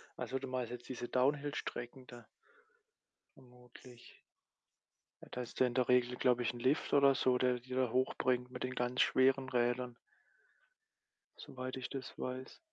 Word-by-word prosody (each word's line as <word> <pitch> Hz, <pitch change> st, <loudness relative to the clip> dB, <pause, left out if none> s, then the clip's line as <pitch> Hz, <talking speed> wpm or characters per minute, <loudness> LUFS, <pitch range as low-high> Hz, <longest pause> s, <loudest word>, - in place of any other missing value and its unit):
also, 135 Hz, -, -3 dB
du 135 Hz, -, -6 dB
meinst 125 Hz, -2 st, -3 dB
jetzt 120 Hz, 0 st, -8 dB
diese 120 Hz, -2 st, -5 dB
Downhill-Strecken 135 Hz, -2 st, -1 dB
da 120 Hz, -2 st, -12 dB, 1.1 s
vermutlich. 125 Hz, -1 st, -16 dB, 1.1 s
Ja, -, -, -11 dB
da 125 Hz, -, -4 dB
hast 120 Hz, -, -8 dB
du 130 Hz, -, +6 dB
in 120 Hz, -1 st, -2 dB
der 125 Hz, -2 st, +2 dB
Regel, 125 Hz, 0 st, +3 dB
glaube 125 Hz, -1 st, +2 dB
ich, 120 Hz, -, 0 dB
'n 120 Hz, -, -9 dB
Lift 130 Hz, +5 st, +1 dB
oder 140 Hz, -1 st, +6 dB
so, 130 Hz, -1 st, +2 dB
der 125 Hz, 0 st, +2 dB
die 125 Hz, +1 st, -7 dB
da 130 Hz, -3 st, +1 dB
hochbringt 125 Hz, 0 st, +1 dB
mit -, -, -6 dB
den 130 Hz, 0 st, -2 dB
ganz 125 Hz, 0 st, 0 dB
schweren 130 Hz, 0 st, +3 dB
Rädern 120 Hz, 0 st, 0 dB, 1.4 s
soweit 130 Hz, 0 st, -6 dB
ich 125 Hz, -1 st, -5 dB
das 135 Hz, -2 st, -7 dB
weiß. 130 Hz, +1 st, -5 dB
125 Hz, 160 wpm, -35 LUFS, 125-130 Hz, 1.4 s, du